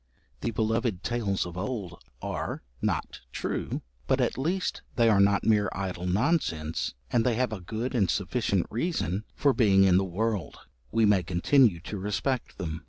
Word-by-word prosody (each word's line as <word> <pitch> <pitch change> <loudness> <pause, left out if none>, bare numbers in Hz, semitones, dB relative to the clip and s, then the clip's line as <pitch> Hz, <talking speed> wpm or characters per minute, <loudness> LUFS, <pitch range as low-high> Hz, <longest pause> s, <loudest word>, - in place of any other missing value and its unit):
The - - -2
beloved 110 -2 0
tales 105 -7 0
of 90 -1 -7
old 100 -2 -4 0.2
are - - -3 0.2
'not - - -2
true' - - -3 0.2
but - - +2
at - - +1
least 175 +8 -1
they 115 -1 +4
are 105 -3 +4
not 100 0 +4
mere 105 -2 +3
idle 90 -2 -3
nonsense, 90 - 0 0.2
and 115 - +3
they 120 -1 +2
have 125 -2 0
a 100 - -5
good 110 +7 -3
and 105 -7 +2
sufficient 100 -2 0
reason 110 - -1
for 140 -2 +3
being 100 -5 +5
in 95 -2 +5
the 95 - +3
world; 100 +1 -2 0.3
we 115 - +3
may 100 -3 +4
continue 90 - +3
to 100 +3 -6
respect 105 +6 -2
them. 80 -2 -4
105 Hz, 170 wpm, -28 LUFS, 95-120 Hz, 0.3 s, being